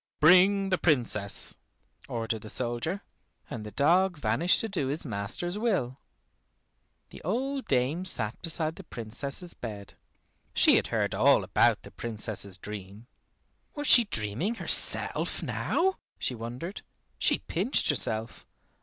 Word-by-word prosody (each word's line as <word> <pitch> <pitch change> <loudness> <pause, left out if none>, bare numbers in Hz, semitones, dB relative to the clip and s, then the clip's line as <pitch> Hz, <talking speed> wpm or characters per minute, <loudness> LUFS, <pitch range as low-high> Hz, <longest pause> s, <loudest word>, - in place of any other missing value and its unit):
"Bring 190 +4 +5
the 185 - +2
Princess," 120 - +1 0.5
ordered 115 -1 -3
the 110 - -9
soldier, 125 - -3 0.5
and 115 - -5
the 105 - -7
dog 175 - +2
vanished 145 +8 +2
to 225 - -2
do 185 -10 -2
his 145 +4 -2
master's 125 - -2
will. 160 - -1 1.1
The - - -11
old 265 - -2
dame 135 +7 +1
sat 110 - -1
beside 160 -1 -2
the 195 - -9
Princess's 140 +6 -5
bed. 105 -4 -8 0.6
She - - +6
had - - +2
heard - - -1
all - - +4
about - - +2
the - - -12
Princess's 105 -4 -4
dream. 100 +2 -9 0.7
"Was 290 -1 -4
she 240 -3 +7
dreaming 120 - -2
herself - - +1
now?" 380 +2 0 0.2
she - - +1
wondered. 125 - -6 0.4
She - - +4
pinched 190 - +1
herself. 110 -3 0
140 Hz, 130 wpm, -28 LUFS, 110-185 Hz, 1.1 s, she